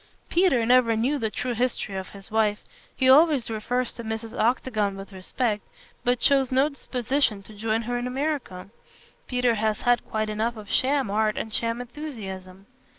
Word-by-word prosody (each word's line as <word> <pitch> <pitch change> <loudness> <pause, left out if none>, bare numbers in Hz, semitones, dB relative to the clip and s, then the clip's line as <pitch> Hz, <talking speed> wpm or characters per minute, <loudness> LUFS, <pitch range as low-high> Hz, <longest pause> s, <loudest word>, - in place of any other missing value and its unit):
Peter 335 -10 +3
never 245 -1 +4
knew 260 +6 +1
the 220 - 0
true 250 +3 -3
history 235 -4 -1
of 190 -1 -5
his 200 0 -11
wife. 215 -1 +1 0.3
He 260 - +2
always 280 -3 +5
refers 245 +3 -1
to 235 - -8
Mrs. 220 0 -5
Octagon 215 -4 0
with 195 +1 -9
respect, 210 +3 -2 0.4
but 245 -1 +1
shows 270 -2 +4
no 265 +3 +3
disposition 255 -5 -1
to 215 - -13
join 220 +2 -1
her 245 +2 -2
in 245 - -3
America. 250 -9 -3 0.6
Peter 250 -1 +2
has 215 -1 0
had 245 -2 +3
quite 215 0 -2
enough 220 +2 -1
of 210 -1 -9
sham 270 -4 +2
art 215 0 +1
and 220 - -4
sham 230 +1 0
enthusiasm. 200 -9 -8
230 Hz, 170 wpm, -25 LUFS, 215-255 Hz, 0.6 s, always